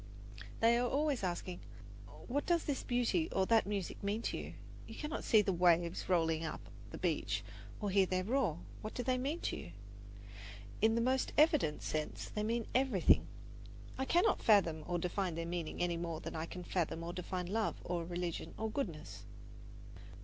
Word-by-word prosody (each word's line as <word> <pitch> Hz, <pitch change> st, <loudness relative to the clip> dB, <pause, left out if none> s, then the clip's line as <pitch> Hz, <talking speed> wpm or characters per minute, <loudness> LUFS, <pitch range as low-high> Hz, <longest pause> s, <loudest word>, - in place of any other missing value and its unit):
They 230 Hz, +1 st, +5 dB
are 245 Hz, 0 st, +1 dB
always 290 Hz, -1 st, +1 dB
asking: 180 Hz, 0 st, -3 dB, 0.7 s
"What 285 Hz, +4 st, -1 dB
does 340 Hz, -2 st, +3 dB
this 285 Hz, -3 st, -1 dB
beauty 245 Hz, +8 st, +1 dB
or 190 Hz, -, +2 dB
that 225 Hz, 0 st, +4 dB
music 200 Hz, -3 st, -3 dB
mean 205 Hz, +3 st, -1 dB
to -, -, -1 dB
you? -, -, -5 dB, 0.3 s
You -, -, -9 dB
cannot 300 Hz, +1 st, -4 dB
see 215 Hz, -2 st, +5 dB
the 195 Hz, -, +1 dB
waves 170 Hz, 0 st, +2 dB
rolling 165 Hz, -2 st, +2 dB
up 160 Hz, -, -4 dB, 0.3 s
the -, -, -7 dB
beach -, -, 0 dB, 0.4 s
or 205 Hz, -2 st, -1 dB
hear 195 Hz, -1 st, +4 dB
their 185 Hz, 0 st, 0 dB
roar. 220 Hz, -, +1 dB, 0.2 s
What 215 Hz, -, -6 dB
do 245 Hz, -, -2 dB
they 255 Hz, 0 st, +1 dB
mean 290 Hz, +7 st, -2 dB
to -, -, -2 dB
you?" 85 Hz, -, -9 dB, 1.1 s
In 220 Hz, +1 st, +4 dB
the 230 Hz, -, +2 dB
most 260 Hz, +2 st, +1 dB
evident 300 Hz, -, +4 dB
sense 155 Hz, -1 st, -3 dB
they 210 Hz, -, -3 dB
mean 230 Hz, +1 st, 0 dB
everything. 255 Hz, -8 st, +4 dB, 0.7 s
I 265 Hz, -, -1 dB
cannot 350 Hz, +9 st, +3 dB
fathom 170 Hz, -8 st, +4 dB
or 175 Hz, 0 st, 0 dB
define 180 Hz, 0 st, -1 dB
their 165 Hz, 0 st, -3 dB
meaning 170 Hz, -1 st, -3 dB
any 175 Hz, -1 st, 0 dB
more 165 Hz, -2 st, -3 dB
than -, -, -6 dB
I 160 Hz, +1 st, -3 dB
can 180 Hz, +1 st, -7 dB
fathom 165 Hz, -2 st, -1 dB
or 170 Hz, +1 st, -4 dB
define 180 Hz, 0 st, -3 dB
love 215 Hz, +5 st, 0 dB
or 175 Hz, -1 st, -2 dB
religion 175 Hz, 0 st, -4 dB
or 220 Hz, 0 st, -2 dB
goodness. 170 Hz, -, -4 dB
195 Hz, 180 wpm, -35 LUFS, 170-245 Hz, 1.1 s, They